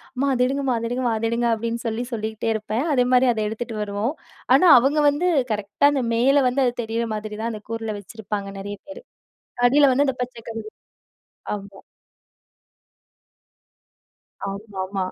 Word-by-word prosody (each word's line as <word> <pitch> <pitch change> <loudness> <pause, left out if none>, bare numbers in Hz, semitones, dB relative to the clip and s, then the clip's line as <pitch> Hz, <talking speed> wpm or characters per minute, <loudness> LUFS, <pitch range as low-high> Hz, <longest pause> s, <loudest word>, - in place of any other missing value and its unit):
"அம்மா 270 +2 0
அத 250 -1 +2
எடுங்கம்மா 270 -1 0
அத 230 0 -2
எடுங்கம்மா 245 -1 0
அத 225 +1 -1
எடுங்க." 235 +1 0
அப்படின்னு 230 +1 -2
சொல்லி 225 +2 -2
சொல்லிகிட்டே 220 0 -3
இருப்பேன். 220 +4 -2
அதே 250 -2 +3
மாரி 255 +1 +5
அத 220 - -2
எடுத்துட்டு 225 +1 -5
வருவோம். 210 +5 -2 0.4
ஆனா, 370 - +5
அவங்க 280 +5 +2
வந்து 295 +5 0 0.3
கரெக்ட்டா, 210 +6 +1
அந்த 270 -3 0
மேல 270 +4 +4
வந்து 265 +2 +1
அது 245 - +1
தெரியிற 230 +1 -2
மாதிரி 210 0 -6
தான் 230 +1 -2
அந்த 215 - -7
கூறுல 225 -2 -3
வச்சிருப்பாங்க, 205 0 -6
நிறைய 205 +1 -6
பேரு. 290 - -9 0.7
அடியில 280 +2 +5
வந்து 280 +3 +2
அந்த 265 -1 -1
பச்சை 240 -2 -9
கலரு 225 -1 -6 0.9
ஆமா. 200 -1 -11 2.7
ஆம்மாமா. 195 -1 -4
230 Hz, 155 wpm, -23 LUFS, 215-255 Hz, 2.7 s, மாரி